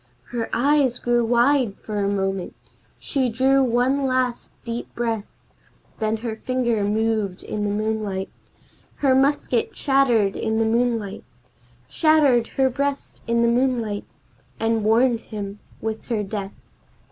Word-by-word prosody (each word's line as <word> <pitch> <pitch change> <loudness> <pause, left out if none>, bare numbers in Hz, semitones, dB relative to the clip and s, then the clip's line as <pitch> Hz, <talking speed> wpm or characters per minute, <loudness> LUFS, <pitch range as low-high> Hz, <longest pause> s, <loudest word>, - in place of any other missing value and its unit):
Her 235 -2 -3
eyes 275 -1 +2
grew 240 0 +1
wide 240 -1 +3
for 210 -1 -5
a 200 0 +1
moment, 195 -2 -2 0.4
she 265 -3 -1
drew 265 +4 +3
one 255 +3 +1
last 255 -2 -1
deep 235 0 -5
breath, 225 -3 -2 0.7
Then 220 0 0
her 220 -2 -3
finger 240 -4 0
moved 210 -2 0
in 210 -1 -3
the - - 0
moonlight 210 -2 -2 0.6
Her 275 -2 +2
musket 290 - +1
shattered 245 -8 +3
the - - -7
moonlight 225 -1 0 0.6
Shattered 280 - +3
her 265 -1 +4
breast 280 +2 -3
in 235 0 +2
the - - +4
moonlight 235 -4 0 0.5
and 225 -1 +1
warned 230 +2 +3
him 205 -2 -7 0.2
with 220 0 -4
her 220 -4 -1
death. 200 -1 -5
235 Hz, 130 wpm, -23 LUFS, 215-255 Hz, 0.7 s, her